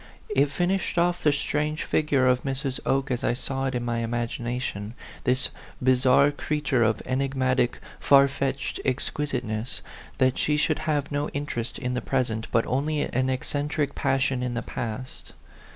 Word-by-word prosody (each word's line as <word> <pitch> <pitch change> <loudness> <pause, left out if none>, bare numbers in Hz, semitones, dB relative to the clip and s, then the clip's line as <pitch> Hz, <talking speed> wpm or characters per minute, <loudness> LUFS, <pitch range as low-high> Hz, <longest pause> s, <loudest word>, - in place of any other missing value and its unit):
It 140 +2 +4
fin 175 +5 0
ished 195 -2 -1
off 175 +1 +2
the 150 - +4
strange 150 +2 -1
figure 145 -4 +2
of 125 -1 +3
Mrs. 135 -1 -2
Oke 135 0 +1
as 125 - -1
I 120 - +2
saw 135 +1 -2
it 130 -1 -1
in 120 -1 -2
my 120 -1 -1
imagination 120 -2 -3 0.3
this 130 +1 +2 0.3
bizarre 130 +2 +4
creat 150 0 -3
ure 125 -3 +4
of 110 -1 +2
enigmatic, 130 -1 +1 0.2
far 140 0 +6
fetched 135 0 -2
exquisiteness 125 -4 -2 0.4
that 130 -1 +2
she 150 0 +2
should 155 +1 +1
have 145 -2 0
no 145 +1 -1
interest 135 -4 -3
in 125 -2 -2
the 125 - -1
pres 130 -3 0
ent, 110 0 -4
but 115 - +3
only 145 +4 0
an 130 -1 0
eccentric 145 +2 -1
passion 135 -1 +1
in 125 -1 -2
the 115 - -2
past. 120 +3 -5
130 Hz, 170 wpm, -26 LUFS, 125-145 Hz, 0.4 s, far